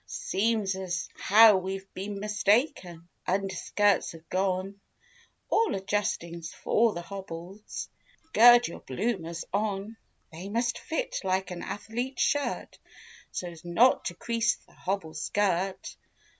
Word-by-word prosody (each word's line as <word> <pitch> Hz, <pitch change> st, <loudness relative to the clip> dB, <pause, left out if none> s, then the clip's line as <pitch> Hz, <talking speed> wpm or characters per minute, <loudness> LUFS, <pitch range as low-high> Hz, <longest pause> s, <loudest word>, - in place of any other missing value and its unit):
129 220 Hz, +2 st, +2 dB
Seems 190 Hz, 0 st, 0 dB
as 180 Hz, -1 st, -3 dB
how 215 Hz, 0 st, +7 dB
we've 190 Hz, +1 st, -5 dB
been 200 Hz, +2 st, -5 dB
mistaken— 205 Hz, -, 0 dB, 0.2 s
Underskirts 195 Hz, +1 st, +1 dB
have 165 Hz, 0 st, -14 dB
gone; 190 Hz, +1 st, -1 dB, 0.7 s
All 450 Hz, -1 st, +2 dB
adjustings 170 Hz, -4 st, -2 dB
'fore 230 Hz, -1 st, +2 dB
the 175 Hz, -, -5 dB
hobble's: 190 Hz, +1 st, -7 dB, 0.5 s
Gird 240 Hz, +2 st, +8 dB
your -, -, -8 dB
bloomers 170 Hz, -, -3 dB
on; 205 Hz, +1 st, -2 dB, 0.3 s
They 175 Hz, +5 st, -8 dB
must 235 Hz, +3 st, 0 dB
fit 320 Hz, -, -3 dB
like 190 Hz, 0 st, 0 dB
an 175 Hz, -, -5 dB
athlete's 245 Hz, +5 st, -3 dB
shirt 290 Hz, -1 st, -1 dB, 0.5 s
So's 170 Hz, -3 st, -6 dB
not 195 Hz, +10 st, +4 dB
to 175 Hz, -, -3 dB
crease 230 Hz, +4 st, +1 dB
the -, -, -22 dB
hobble 185 Hz, -4 st, -3 dB
skirt. 190 Hz, +3 st, -1 dB
195 Hz, 120 wpm, -28 LUFS, 180-215 Hz, 0.7 s, Gird